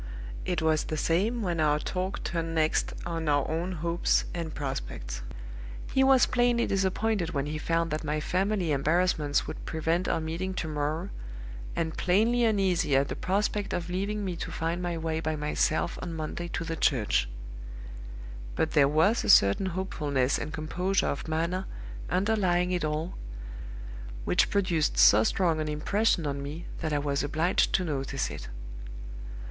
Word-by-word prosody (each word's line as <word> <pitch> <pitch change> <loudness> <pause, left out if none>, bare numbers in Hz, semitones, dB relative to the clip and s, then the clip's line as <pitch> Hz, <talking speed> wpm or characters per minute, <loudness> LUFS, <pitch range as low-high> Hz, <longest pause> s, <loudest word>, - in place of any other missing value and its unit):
It 175 -3 -1
was 155 -1 +2
the 155 - -3
same 205 +10 +1
when 175 -3 -1
our 150 -1 +3
talk 185 +5 -3
turned 165 -1 -2
next 155 -1 +1
on 165 -2 -2
our 145 -1 +2
own 170 +4 -2
hopes 170 +1 +1
and 165 -2 -4
prospects. 130 - -5 0.7
He 265 - +4
was 265 -2 +6
plainly 240 -1 +2
disappointed 190 -2 0
when 140 0 0
he 155 +1 -3
found 165 0 0
that 155 +1 -2
my 155 0 -1
family 185 +1 0
embarrassments 150 0 +2
would - - -7
prevent 165 +3 -1
our - - +1
meeting 170 +4 -3
to 170 - -2
morrow, 155 +4 -2 0.7
and 160 -1 -1
plainly 225 +7 +3
uneasy 190 -9 +2
at 135 +1 +3
the - - -3
prospect 205 +1 -1
of 175 0 -3
leaving 200 +3 -2
me 180 -2 -2
to - - -5
find 165 +2 -2
my 175 -1 -2
way 160 0 -2
by 155 -1 -1
myself 150 +2 0
on 170 -2 -5
Monday 160 +2 -4
to 170 - -3
the 165 0 -3
church. 105 - +2 1.3
But 160 - 0
there 140 -3 +5
was 165 +10 +3
a - - -2
certain 100 - +6
hopefulness 150 -8 0
and 155 - -4
composure 180 +4 0
of 140 - -4
manner 170 +4 -1 0.4
underlying 185 -1 +2
it 180 -2 0
all, 155 +3 -2 1.1
which - - +3
produced 175 -6 +1
so 110 +2 +7
strong 165 +4 +1
an 155 - -2
impression 170 +4 +1
on 140 -1 -2
me 150 +4 -6
that 160 -2 -2
I 145 - +1
was 140 -1 0
obliged 155 +5 +1
to 185 - +3
notice 135 -4 -2
it. - - -7
165 Hz, 165 wpm, -28 LUFS, 150-185 Hz, 1.3 s, so